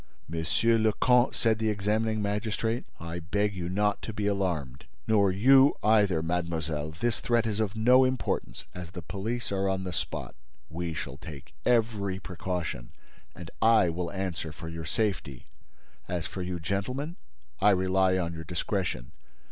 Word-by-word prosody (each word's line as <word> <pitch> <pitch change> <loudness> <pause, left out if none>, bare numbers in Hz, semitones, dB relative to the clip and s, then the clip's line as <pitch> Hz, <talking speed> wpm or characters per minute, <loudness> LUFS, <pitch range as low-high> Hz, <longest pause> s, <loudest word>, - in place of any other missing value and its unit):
"Monsieur 85 +8 +2
le 110 -1 +3
Comte," 125 +2 +3
said 110 -2 +2
the 110 -1 +1
examining 105 +1 0
magistrate, 110 +3 -1
"I 85 +1 -5
beg 100 +5 0
you 90 -2 -4
not 105 +2 +1
to - - -5
be 105 -1 -2
alarmed. 85 -10 -1 0.2
Nor 100 -3 +4
you 135 +8 +6
either, 100 -6 +4
mademoiselle. 80 -3 -2
This 110 +9 -1
threat 120 -1 +2
is 110 -1 -1
of 110 -1 -1
no 125 +4 +6
importance, 130 - -1
as 90 -2 -7
the 90 -1 -8
police 100 +9 -3
are 95 0 +1
on 95 0 -1
the 90 -1 -4
spot. - - -4 0.4
We 85 0 -3
shall 70 - -5
take 75 -5 -10
every 110 -5 +1
precaution 90 -9 -4 0.4
and 85 -2 -9
I 110 -5 +5
will 85 +1 -3
answer 90 -5 -3
for 80 +2 -8
your 80 -1 -6
safety. 85 - -2 0.6
As 85 -2 -2
for 95 - -5
you, 90 -1 -3
gentlemen. 125 - -3 0.4
I 105 - +5
rely 95 -1 +3
on 85 -2 -1
your 80 -1 -6
discretion. 85 - -2
95 Hz, 160 wpm, -28 LUFS, 85-110 Hz, 0.6 s, you